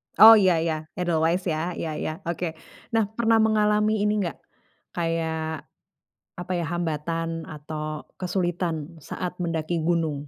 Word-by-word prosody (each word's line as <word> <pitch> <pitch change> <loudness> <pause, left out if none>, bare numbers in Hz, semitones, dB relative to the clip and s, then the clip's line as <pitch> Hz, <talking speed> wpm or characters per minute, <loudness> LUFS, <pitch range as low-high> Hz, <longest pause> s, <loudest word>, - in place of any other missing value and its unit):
Oh, 225 +1 +11
iya 185 -4 +4
iya, 165 -1 0 0.2
Edelweis 170 +1 +1
ya, 155 - -1 0.2
iya 160 - -2
iya - - -2 0.2
oke. 175 +1 -2 0.5
Nah, 225 - +4
pernah 225 -1 +4
mengalami 210 0 +3
ini 210 0 +2
nggak, 170 - -4 0.6
kayak 160 -2 -2 0.7
apa, 175 +1 -5
ya, 170 - -1
hambatan 165 0 -2 0.3
atau 155 0 -6
kesulitan 175 -2 -1 0.2
saat 175 +4 -5
mendaki 165 -1 -2
gunung? 160 -4 0
170 Hz, 130 wpm, -25 LUFS, 160-185 Hz, 0.7 s, Oh